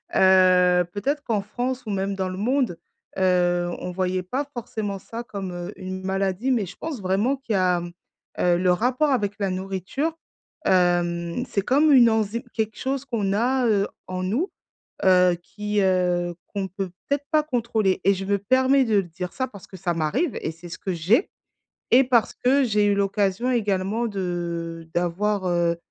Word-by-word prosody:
heu, 185 -1 +5
peut-être 280 +10 -2
qu'en 220 -6 0
France 245 +5 -3
ou 215 - -4
même 195 0 -1
dans 190 -1 -2
le 185 - -6
monde, 240 -3 0 0.4
heu, 175 -2 +2
on 180 - -5
voyait 185 0 -1
pas 255 +10 -2
forcément 220 -4 -4
ça 230 +5 -7
comme, 195 -5 -6
heu, 175 +3 -6
une 185 0 -6
maladie 195 +5 -1
mais 230 -6 +1
je 185 +3 -10
pense 315 -6 -5
vraiment 195 +8 +1
qu'il 260 -4 -4
y - - +2
a, 180 -1 +2 0.6
heu, 175 -1 +3
le 180 0 +2
rapport 250 - +1
avec 205 -6 0
la 200 -1 0
nourriture, 195 - -3 0.5
hem, 175 +3 +1
c'est 200 - -1
comme 290 +6 +4
une 240 -3 +7
enzyme, 220 +1 0
quelque 220 -1 -2
chose 270 +1 -2
qu'on 215 -7 -1
a, 250 +4 +2
heu, 205 -2 +2 0.2
en 185 0 -4
nous, 245 - -1 0.5
heu, 180 -1 +5
qui, 210 +2 -2
heu, 180 -2 +1
qu'on 195 -1 -3
peut 190 0 -5 0.2
peut-être 285 0 0
pas 310 -1 +4
contrôler 225 -8 0
et 195 - +5
je 195 0 -5
me 200 +1 +2
permets 260 +6 +3
de 220 -3 +1
le 195 - +3
dire, 175 +1 -6
ça, 260 0 -2
parce 200 -5 -13
que 190 - -11
ça 175 -1 -1
m'arrive 215 - 0
et - - -2
c'est 170 +2 -12
ce 170 - -7
que 190 - -3
j'ai 190 - +2 0.6
et 255 - +8
parce 245 -3 +2
que 270 +2 +2
j'ai 210 -3 +2
eu 205 - +3
l'occasion 200 +3 0
également 210 0 0
de 170 -4 -4
d'avoir, 190 +3 0
heu 170 -1 +1
195 Hz, 185 wpm, -24 LUFS, 180-235 Hz, 0.6 s, et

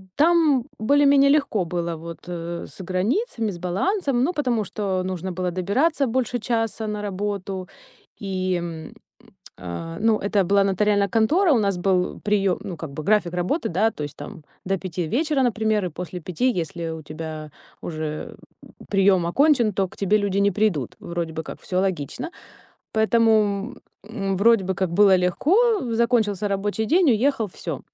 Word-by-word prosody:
там 310 -5 +4
более-менее 280 +4 +4
легко 275 -10 +2
было 170 0 -3
вот, 165 +1 -8
э, 170 -1 -5
с - - -10
границами, 220 - -1
с 180 - -8
балансом. 250 - 0
Ну, 340 +7 +1
потому 250 -8 0
что 195 -3 -2
нужно 185 0 -4
было 180 0 -2
добираться 260 - +1
больше 245 0 -1
часа 225 -1 -2
на 210 -1 -3
работу. 195 -2 -4 0.5
И, 185 -2 -1
м, 170 -2 -5 0.7
э, 130 - -6
ну, 220 0 +2
это 200 -1 +1
была 200 +2 +3
нотариальная 200 +1 +2
контора, 305 - +3
у 245 - +3
нас 200 -3 0
был 180 0 0
приём, 200 -3 +1
ну, 185 -5 -6
как 160 - -6
бы 150 +2 -6
график 200 -2 +2
работы, 180 - -1
да, 210 +6 +2
то 150 - -6
есть 145 - -6
там 175 -7 -10 0.2
до 195 +1 0
5 175 -2 -4
вечера, 280 - +1
например, 220 -4 +1
и - - -2
после 180 +2 -7
5, 180 +10 0
если 170 -3 -4
у 160 0 -6
тебя 155 0 -7 0.3
уже 155 -2 -5 0.5
приём 195 -3 +3
окончен, 255 - +3
то 190 0 0
к - - -17
тебе 200 +1 +2
люди 200 -2 -1
не 200 0 +3
придут. 180 - 0
Вроде 170 -1 -4
бы 160 - -4
как - - -8
всё 185 0 -1
логично, 190 - -3 0.6
поэтому, 220 -1 +2 0.3
м, 195 -3 -2
вроде 220 0 +4
бы 190 +1 -1
как 190 -3 -1
было 200 +1 +6
легко: 380 - +2
закончился 225 -4 +1
рабочий 205 +2 -1
день, 345 - +4
уехал, 240 0 +2
всё. 165 -5 -6
200 Hz, 165 wpm, -23 LUFS, 180-230 Hz, 0.7 s, было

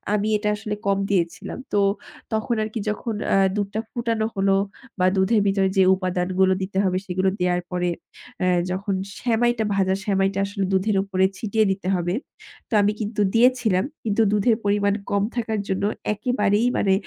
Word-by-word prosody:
আমি 210 0 0
এটা 210 0 -1
আসলে 210 0 -4
কম 195 0 +3
দিয়েছিলাম। 170 -4 -1 0.2
তো 205 - +3 0.5
তখন 220 +2 0
আর 215 - -3
কি 225 - -2
যখন 215 +2 -3 0.2
আ - - +5 0.2
দুধটা 205 +1 -2
ফুটানো 230 -2 -1
হলো 195 0 +2 0.5
বা 180 - +3
দুধের 200 +3 +3
ভিতরে 195 -1 +2
যে 190 - +6
উপাদানগুলো 185 0 +1
দিতে 190 +1 -4
হবে 185 -1 +1
সেগুলো 185 +1 +1
দেয়ার 180 0 +1
পরে 180 0 0 0.8
যখন 195 +2 -2
অ্যা 195 - -7
সেমাইটা 240 -1 +2
ভাজা 190 -1 +2
সেমাইটা 195 -1 +1
আসলে 195 -1 -2
দুধের 195 +2 +2
উপরে 190 -1 +1
ছিটিয়ে 220 0 +1
দিতে 190 -1 -4
হবে। 175 0 -1 0.6
তো - - -7
আমি 205 +1 +3
কিন্তু 210 0 -2
দিয়েছিলাম, 230 -5 +3 0.2
কিন্তু 220 0 +1
দুধের 210 +2 +3
পরিমাণ 200 0 +2 0.2
কম 200 0 +1
থাকার 220 -3 -1
জন্য 190 +1 -1 0.3
একেবারেই 210 -1 +1
মানে 195 -2 +3
200 Hz, 165 wpm, -23 LUFS, 190-220 Hz, 0.8 s, যে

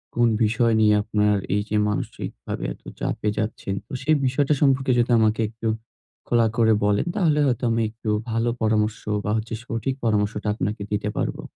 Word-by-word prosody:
কোন 120 0 +4 0.2
বিষয় 115 +2 +2
নিয়ে 105 -1 +5
আপনার 105 -1 +2 0.2
এই 105 - +2
যে 105 - -1
মানসিকভাবে 105 - -5
এত - - -21 0.2
চাপে 105 - -1
যাচ্ছেন? 105 -3 -2
তো 145 - -11
সেই 155 +2 +3
বিষয়টা 140 +3 +2
সম্পর্কে 135 -2 +3
যদি 120 +1 +2
আমাকে 110 0 +2
একটু 115 0 -5 0.6
খোলা 120 -1 +3
করে 110 -1 +5
বলেন। 105 0 +2
তাহলে 160 -7 +2
হয়তো 125 -2 0
আমি 115 0 +1
একটু 110 0 -6 0.2
ভালো 115 +1 +1
পরামর্শ 110 -1 +1 0.3
বা 105 - 0
হচ্ছে 115 +1 -4
সঠিক 115 +3 -2
পরামর্শটা 105 -1 0
আপনাকে 105 -1 -3
দিতে 105 0 -1
পারবো। - - -2
110 Hz, 170 wpm, -23 LUFS, 105-120 Hz, 0.6 s, নিয়ে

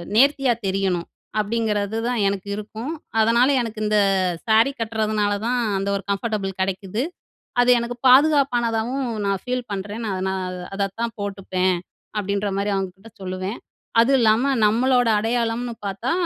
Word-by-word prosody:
நேர்த்தியா 275 +1 +4
தெரியணும்.' 190 -3 0 0.3
அப்படிங்கிறது 215 -1 -1
தான் 245 -1 0
எனக்கு 200 0 -2
இருக்கும். 215 +6 -6 0.3
அதனால 235 +3 +4
எனக்கு 225 -2 -5
இந்த 210 0 +3 0.5
ஸாரி 225 +5 +5
கட்டுறதுனால 215 -2 0
தான், 245 +1 +1 0.2
அந்த 195 +1 -2
ஒரு 195 - -3
கம்ஃபர்டபுள் 200 -2 -2
கெடைக்குது. 195 +4 -2 0.6
அது 245 - +3
எனக்கு 235 +1 -4
பாதுகாப்பானதாகவும் 255 -3 +3 0.2
நான் 195 -1 0
ஃபீல் 250 -1 -3
பண்றேன். 205 +4 -5
நான் 190 -2 -2
நான் 185 -1 -3 0.2
அதத்தான் 205 +4 -2
போட்டுப்பேன்." 190 -2 -1 0.4
அப்படின்ற 200 0 -1
மாரி 200 +1 0
அவங்க 190 -1 -2
கிட்ட 220 +2 -15
சொல்லுவேன். 185 +3 -4 0.4
"அது 250 +4 +3
இல்லாம 235 +4 +3
நம்மளோட 245 +3 +3
அடையாளம்னு 235 +1 -1
பார்த்தா, 200 +7 -2
215 Hz, 135 wpm, -22 LUFS, 195-240 Hz, 0.6 s, ஸாரி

